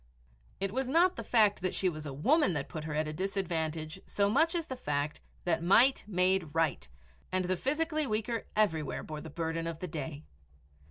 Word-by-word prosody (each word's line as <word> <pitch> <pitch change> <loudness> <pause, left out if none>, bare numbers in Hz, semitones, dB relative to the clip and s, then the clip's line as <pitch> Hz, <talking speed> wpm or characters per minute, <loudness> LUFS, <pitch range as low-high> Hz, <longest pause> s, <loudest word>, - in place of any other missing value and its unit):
It 195 0 -1
was 265 +1 -1
not 345 +7 +4
the - - -5
fact 210 -5 +3
that 185 0 -1
she 190 - +1
was 155 -3 -3
a - - -4
woman 225 - +3
that 145 -3 -3
put 155 -3 -6
her 155 -2 -3
at 155 0 0
a 155 - -4
disadvantage 165 -3 -2
so 200 0 +1
much 320 +8 +3
as 335 -2 0
the 260 - -5
fact 145 - -2 0.2
that 165 -2 +1
might 235 +10 +5
made 180 -5 +1
right, 155 - 0 0.4
and 185 0 +1
the 185 +1 +1
physically 305 - 0
weaker 220 +1 -2
everywhere 160 -9 +1
bore 155 -1 -6
the 160 - -8
burden 165 +1 -2
of 165 -1 -4
the 180 - -5
day. 150 -1 -5
180 Hz, 200 wpm, -31 LUFS, 155-220 Hz, 0.4 s, might